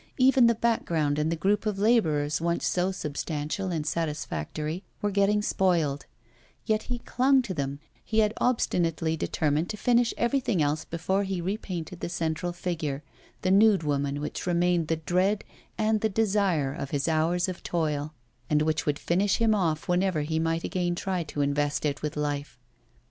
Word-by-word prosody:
Even 260 -2 +6
the 235 - +3
background 165 -11 0
and 155 +2 +1
the - - +1
group 200 +6 +1
of 210 -2 -1
labourers, 160 -10 +2
once 170 0 0
so 180 +1 +1
substantial 155 +2 -3
and 160 -3 -2
satisfactory, 155 - -3 0.2
were 205 - -1
getting 200 +1 +2
spoiled; 165 -9 +1 0.6
yet 215 0 +1
he 245 - -1
clung 260 +2 +2
to 205 -6 -4
them, 140 -3 -3 0.2
he 220 - -3
had 215 -1 +4
obstinately 165 -9 +1
determined 155 +1 0
to 215 - -4
finish 240 +1 +3
everything 240 -5 +1
else 150 +1 0
before 180 +4 -1
repainting 185 -2 -4
the - - -4
central 170 0 -2
figure, 165 -5 -3 0.4
the 185 - +2
nude 200 -2 +5
woman, 145 -1 -1
which 150 - -4
remained 175 -1 +2
the 165 - +1
dread 180 +6 +1 0.3
and 215 -1 +1
the 220 - +2
desire 195 -9 +1
of 140 - -5
his 140 +1 -1
hours 165 +3 +1
of 185 -2 -5
toil, 155 -3 -1 0.4
and 150 0 +3
which 155 0 0
would 145 -1 +1
finish 190 +5 +1
him 225 -1 +3
off 165 -6 0
whenever 180 -2 +1
he 160 +2 -1
might 165 +1 0
again 175 -1 -1
try 185 0 -2
to 150 -2 -4
invest 145 +1 0
it 145 -1 -1
with 150 -1 -3
life. 145 -2 -3
170 Hz, 170 wpm, -27 LUFS, 150-200 Hz, 0.6 s, Even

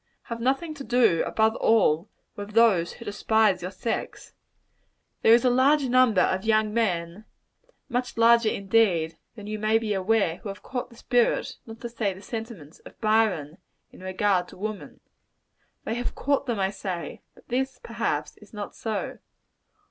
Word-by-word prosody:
Have 230 0 -6
nothing 275 +6 0
to 290 -2 -8
do, 230 -8 +3
above 220 0 +2
all, 195 -5 +3 0.3
with 205 +1 -8
those 210 -7 +4
who 235 - -12
despise 210 -2 +2
your 180 - -4
sex. 225 +4 -5 0.9
There 225 - +7
is 240 - +1
a - - +5
large 275 +4 +4
number 245 -6 +4
of 185 +1 +1
young 215 -1 +2
men 185 -3 -1 0.6
much 245 0 -3
larger, 230 -1 +5
indeed, 195 -6 +1 0.2
than 210 -3 -10
you 215 0 -4
may 215 +1 +3
be 220 -2 -2
aware, 195 -3 +1
who 200 - -8
have 195 - -8
caught 250 -1 -4
the 235 - -17
spirit, 240 0 +1
not 225 +1 -10
to 235 - -5
say 205 -5 -2
sentiments, 210 - -8
of - - -15
Byron, 215 -8 +1 0.3
in - - -15
regard 185 -1 0
to - - -14
woman. 215 +1 -6 0.8
They 220 - -3
have 245 +1 -3
caught 280 0 0
them, 235 -4 -1
I 190 0 +1
say; 185 -4 -6
but - - -22
this, 265 +2 -1
perhaps, 230 -11 -3
is 210 - -18
not 205 -1 -6
so. 220 -3 -4
220 Hz, 165 wpm, -26 LUFS, 190-235 Hz, 0.9 s, There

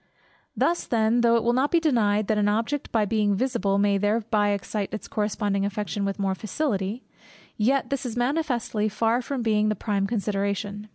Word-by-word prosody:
Thus 345 +1 +1
then, 230 +1 +2
though 235 0 +4
it 230 - +2
will 240 - +2
not 265 +4 +2
be 340 - +3
denied 215 -9 +2
that 215 +1 +1
an 205 - +2
object 230 +7 -1
by 220 -2 +2
being 210 -1 +1
visible 225 -4 0
may 200 0 +2
thereby 210 0 +1
excite 200 0 -2
its 215 - -6
corresponding 205 -1 -1
affection 205 0 -2
with 195 0 -2
more 195 -2 0
facility; 215 +1 -3 0.5
yet 265 +7 +1
this 275 -1 -1
is 245 -2 -4
manifestly 245 -5 0
far 225 +3 +1
from 255 0 -3
being 215 -1 +2
the 215 - 0
prime 200 -1 -1
consideration. 205 -1 -2
215 Hz, 180 wpm, -25 LUFS, 205-240 Hz, 0.5 s, though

